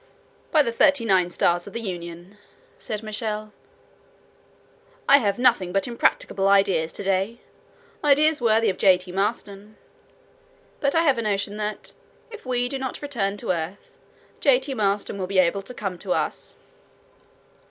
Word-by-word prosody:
"By 310 -3 +4
the 235 - -1
thirty 280 0 +3
nine 185 -4 +3
stars 175 0 +1
of 200 - -10
the - - -3
Union!" 175 0 -8 0.4
said 215 0 -5
Michel, 215 -1 -4 1.5
"I 280 - +7
have 200 -5 0
nothing 240 -8 +2
but 195 +6 0
impracticable 205 -4 0
ideas 195 -5 +3
to - - -6
day; 195 +4 -1 0.6
ideas 295 0 +4
worthy 225 -2 +3
of 185 - -11
J. 190 -3 +6
T. 180 0 -9
Maston. 205 +1 -3 1.0
But 280 +1 0
I 330 - +4
have 275 -7 +3
a - - 0
notion 205 -1 -2
that, 210 0 -4 0.4
if 450 - -11
we 245 -1 0
do 270 +1 -4
not 260 +2 -5
return 205 -8 -2
to 190 - -2
earth, 170 +3 -6 0.4
J. 265 -3 +4
T. 270 +1 -5
Maston 200 -2 -1
will 185 - -3
be 195 0 -2
able 185 +2 +3
to 195 - -11
come 195 -5 -5
to 185 -1 -1
us." - - -3
210 Hz, 160 wpm, -24 LUFS, 195-245 Hz, 1.5 s, I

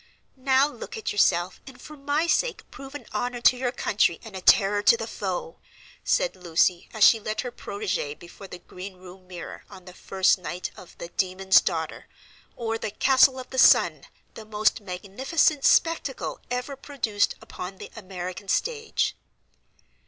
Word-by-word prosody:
"Now, 265 +1 +3
look 265 -6 -8
at 220 - -3
yourself, 180 -3 +1
and, 265 -2 -12
for 305 - -11
my 290 +3 0
sake, 470 +8 0
prove 275 +1 -11
an 290 - -8
honor 245 0 -2
to 250 - +6
your 250 -1 -2
country 205 -8 +1
and 220 -3 -10
a 190 - -6
terror 205 +2 +4
to 465 - +5
the - - -4
foe," 485 -1 -5 0.4
said - - +1
Lucy, 175 0 +1
as 220 -2 +1
she 225 - +7
led 215 0 -3
her 245 - -5
protégée 200 -10 -4
before 175 +3 -12
the 180 - -9
green 185 +2 -10
room 185 0 -14
mirror 180 -2 -9
on 185 -1 -13
the 180 - -11
first 190 +1 +1
night 180 0 -5
of 180 - -14
"The 170 - -8
Demon's 190 0 +3
Daughter, 160 -3 -3 0.5
or 225 -1 -3
The - - -3
Castle 265 +4 +4
of 255 - -9
the 260 - -1
Sun!! - - +5 0.3
The 220 - -10
most 215 0 0
Magnificent 230 - 0
Spectacle 325 -5 +1
ever 250 +3 -3
produced 235 -7 -1
upon 185 +1 -8
the - - -10
American 185 -2 -7
Stage!!!" 445 - -1
210 Hz, 165 wpm, -25 LUFS, 185-265 Hz, 0.5 s, she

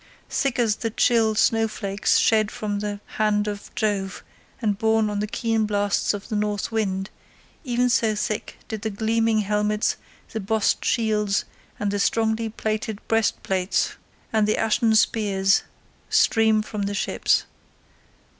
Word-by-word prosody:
Thick 275 -4 0
as 225 -4 +2
the 225 - -2
chill 225 -1 +2
snow 225 +1 +3
flakes 200 -2 0
shed 215 -2 +3
from 205 -1 -3
the 205 0 -4 0.2
hand 210 -1 +2
of 205 -1 -5
Jove 200 -2 -1 0.4
and 210 -4 0
borne 220 0 +2
on 205 - -2
the 210 - -1
keen 225 0 0
blasts 205 -1 +1
of 200 - -8
the 220 - -3
north 210 0 -1
wind, 195 -3 -1 0.5
even 250 -2 +1
so 225 -3 +2
thick 210 0 -3
did 220 -2 -5
the 220 - -2
gleaming 220 +1 +1
helmets, 210 +1 0 0.3
the 220 - -3
bossed 215 +1 0
shields, 210 -3 +1 0.3
the 205 0 -1
strongly 225 +2 +1
plated 215 -1 -3
breastplates, 195 -4 0 0.4
and 215 -1 +3
the 215 - +1
ashen 225 0 +2
spears 195 -3 +3 0.5
stream 220 -1 +3
from 210 -1 -5
the 200 0 -2
ships. - - +1
215 Hz, 145 wpm, -24 LUFS, 205-225 Hz, 0.5 s, snow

